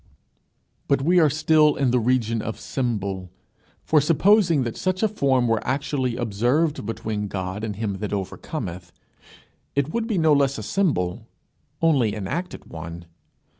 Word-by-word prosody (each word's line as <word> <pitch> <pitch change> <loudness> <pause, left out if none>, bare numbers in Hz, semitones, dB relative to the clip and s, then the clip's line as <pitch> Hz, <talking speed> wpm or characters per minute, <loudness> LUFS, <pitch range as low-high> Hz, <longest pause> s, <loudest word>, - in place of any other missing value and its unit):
But 140 -1 +2
we 175 +4 +4
are 155 -3 +5
still 155 0 +3
in 135 -3 +1
the 125 - +3
region 115 -2 +1
of 110 - -5
symbol. 100 -7 -3 0.5
For 155 -2 +3
supposing 170 0 +4
that 120 -2 -4
such 185 +2 -1
a - - +5
form 135 - +1
were 115 -1 +1
actually 130 -2 -1
observed 125 +5 0
between 105 -2 -3
God 95 +1 -4
and 105 -2 -3
him 100 -2 -3
that 105 - -4
overcometh, 95 - -5 0.8
it 140 +2 0
would 230 -1 -1
be 220 -5 -1
no 160 -2 +4
less 140 -1 +2
a 110 - -5
symbol 105 - -1 0.6
only 130 -10 +3
an 100 -3 -4
acted 175 - -4
one. 85 +1 -8
125 Hz, 155 wpm, -23 LUFS, 105-155 Hz, 0.8 s, are